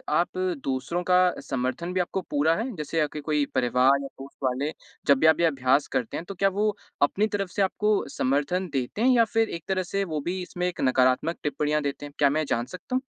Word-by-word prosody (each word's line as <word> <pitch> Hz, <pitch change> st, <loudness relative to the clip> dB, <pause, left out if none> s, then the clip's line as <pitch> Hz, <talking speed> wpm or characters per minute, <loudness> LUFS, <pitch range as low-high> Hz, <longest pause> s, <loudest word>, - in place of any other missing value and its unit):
आप 175 Hz, +3 st, 0 dB, 0.3 s
दूसरों 135 Hz, +6 st, -2 dB
का 180 Hz, 0 st, +4 dB
समर्थन 130 Hz, +7 st, -3 dB
भी 185 Hz, -, 0 dB
आपको 180 Hz, +2 st, -1 dB
पूरा 150 Hz, +3 st, +2 dB
है? 235 Hz, +7 st, -3 dB
जैसे 155 Hz, 0 st, -3 dB
आपके 150 Hz, 0 st, -2 dB
कोई 150 Hz, -1 st, +1 dB
परिवार 130 Hz, +2 st, +3 dB
या 140 Hz, -, -5 dB
दोस्त 135 Hz, +1 st, -13 dB
वाले, 130 Hz, +3 st, 0 dB, 0.4 s
जब 140 Hz, -, +6 dB
भी 160 Hz, -, +5 dB
आप 160 Hz, -, +5 dB
ये 170 Hz, -, +4 dB
अभ्यास 135 Hz, -2 st, +2 dB
करते 115 Hz, -, -2 dB
हैं, 165 Hz, -, -6 dB
तो 195 Hz, -, -7 dB
क्या 195 Hz, +2 st, +3 dB
वो 205 Hz, +2 st, 0 dB, 0.3 s
अपनी 195 Hz, +9 st, +3 dB
तरफ़ 200 Hz, -3 st, -2 dB
से -, -, -1 dB
आपको 210 Hz, +2 st, +1 dB
समर्थन 145 Hz, +8 st, 0 dB
देते 135 Hz, -, -2 dB
हैं 250 Hz, -, +4 dB
या 230 Hz, -1 st, +5 dB
फ़िर 225 Hz, 0 st, +1 dB
एक 170 Hz, -, -6 dB
तरह 190 Hz, -1 st, 0 dB
से 195 Hz, +3 st, -2 dB
वो 160 Hz, -5 st, -3 dB
भी 185 Hz, +2 st, -2 dB
इसमें 180 Hz, 0 st, -3 dB
एक 180 Hz, -, -4 dB
नकारात्मक 130 Hz, +5 st, +2 dB
टिप्पणियाँ 150 Hz, 0 st, 0 dB
देते 145 Hz, 0 st, -4 dB
हैं? 145 Hz, -, -10 dB
क्या 145 Hz, -, +4 dB
मैं 155 Hz, +2 st, 0 dB
जान 120 Hz, +1 st, 0 dB
सकता 185 Hz, -, -6 dB
हूँ। 260 Hz, -, +1 dB
155 Hz, 230 wpm, -26 LUFS, 140-185 Hz, 0.4 s, जब